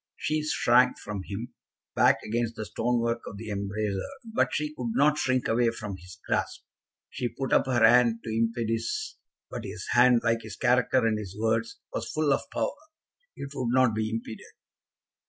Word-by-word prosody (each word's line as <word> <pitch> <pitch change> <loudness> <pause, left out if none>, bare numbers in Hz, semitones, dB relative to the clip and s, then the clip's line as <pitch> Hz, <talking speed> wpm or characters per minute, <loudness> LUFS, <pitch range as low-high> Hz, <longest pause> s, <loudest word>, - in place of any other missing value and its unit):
She 155 0 -1
shrank 125 -4 +3
from 105 -2 -6
him, 115 +5 -6 0.4
back - - +4
against 115 +1 -2
the 110 - -5
stonework 115 +3 0
of 100 - -7
the 110 0 -6
embrasure, 100 0 -2 0.3
but - - +2
she 150 0 -2
could 120 -6 -4
not 145 +3 +3
shrink 130 -1 +1
away 115 +1 +3
from 105 -4 -6
his 90 +1 -13
grasp. - - -1 0.5
She 120 - -2
put 135 +2 -3
up - - +4
her 120 -4 +4
hand 120 -1 +4
to 110 -1 -4
impede 115 0 0
his, 420 - -3 0.3
but - - -5
his - - -6
hand, 120 -1 +5
like 115 -1 +1
his 110 -2 -8
character 125 +1 +2
and 110 -1 +1
his 100 -2 -8
words, 115 +1 0 0.2
was - - -3
full 155 -2 +2
of 140 - -3
power. - - -1 0.6
It 140 0 -7
would 130 -4 -2
not 130 -2 +4
be 110 0 -1
impeded. 115 0 -6
115 Hz, 180 wpm, -27 LUFS, 110-125 Hz, 0.6 s, hand